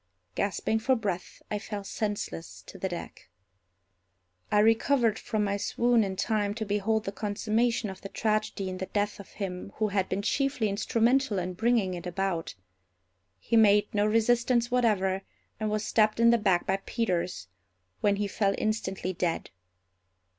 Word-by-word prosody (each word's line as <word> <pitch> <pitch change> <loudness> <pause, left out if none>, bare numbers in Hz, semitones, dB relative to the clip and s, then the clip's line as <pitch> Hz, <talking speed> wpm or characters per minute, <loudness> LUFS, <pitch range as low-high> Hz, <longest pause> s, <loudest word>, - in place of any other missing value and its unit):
Gasping 220 - 0
for 260 +4 +2
breath, 195 -6 -4
I 210 - -1
fell 205 -1 -6
senseless 205 -5 -4
to 195 - -11
the 190 - -2
deck. 175 - -8 1.2
I - - +3
recovered 225 +2 +3
from 215 -2 -1
my 200 0 0
swoon 235 +2 +2
in 190 -1 -3
time 205 +1 0
to 220 -1 -3
behold 210 +2 0
the 195 - -3
consummation 220 +3 0
of 190 -1 -8
the 195 - -7
tragedy 215 -2 -1
in 185 0 -5
the 190 - -3
death 205 0 -1
of 200 - -12
him 190 -1 -5
who 215 -1 0
had 195 -1 0
been 195 +2 -2
chiefly 270 -2 +1
instrumental 230 +3 +2
in 180 0 -2
bringing 220 -1 +1
it 180 0 -6
about. 180 -2 -2 0.8
He 160 - -2
made 210 -2 +5
no 205 0 +2
resistance 235 +2 +2
whatever, 200 -6 +2 0.4
and 215 -1 -1
was 215 0 -1
stabbed 215 0 +2
in 235 0 +6
the 235 - +4
back 190 -4 +2
by 195 +1 0
Peters, 180 - -1 0.5
when 205 -1 +3
he 205 0 -1
fell 200 0 +1
instantly 190 -4 -2
dead. 170 -1 -2
210 Hz, 160 wpm, -28 LUFS, 190-225 Hz, 1.2 s, in